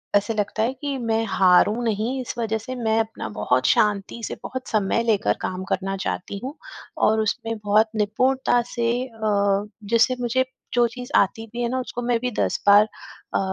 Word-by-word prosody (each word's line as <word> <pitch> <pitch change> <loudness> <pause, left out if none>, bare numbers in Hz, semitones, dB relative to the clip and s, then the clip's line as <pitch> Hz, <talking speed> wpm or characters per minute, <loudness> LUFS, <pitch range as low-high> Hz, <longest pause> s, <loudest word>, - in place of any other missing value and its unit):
ऐसे 205 +3 +2
लगता 215 +1 -1
है 250 +3 0
कि 275 0 -4
मैं 225 -1 0
हारूँ 190 +5 +4
नहीं, 225 +5 -1
इस 250 - -6
वज़ह 220 -1 0
से 255 +4 -6
मैं 225 -2 +1
अपना 225 - -3
बहुत 125 +5 0
शांति 210 +2 +1
से, - - -5
बहुत 260 0 -6
समय 215 +2 +1
लेकर 220 -3 +2
काम 185 0 -3
करना 195 +1 -1
चाहती 200 +2 -4
हूँ 275 +4 -5 0.5
और 220 0 +3
उसमें 225 +1 -2
बहुत 215 +2 +4
निपुणता 245 +4 +2
से 235 -1 +1 0.2
अ, 205 -3 0 0.2
जैसे 230 +4 +3
मुझे 260 +2 +1 0.3
जो 240 -1 +4
चीज़ 245 +1 -9
आती 225 +3 +2
भी 240 - -3
है - - +1
ना, 260 +1 -1
उसको 245 -1 -5
मैं 240 -1 +1
भी 250 0 -2
10 - - 0
बार 205 +1 +8 0.5
अ, - - +3
225 Hz, 185 wpm, -23 LUFS, 205-245 Hz, 0.5 s, बार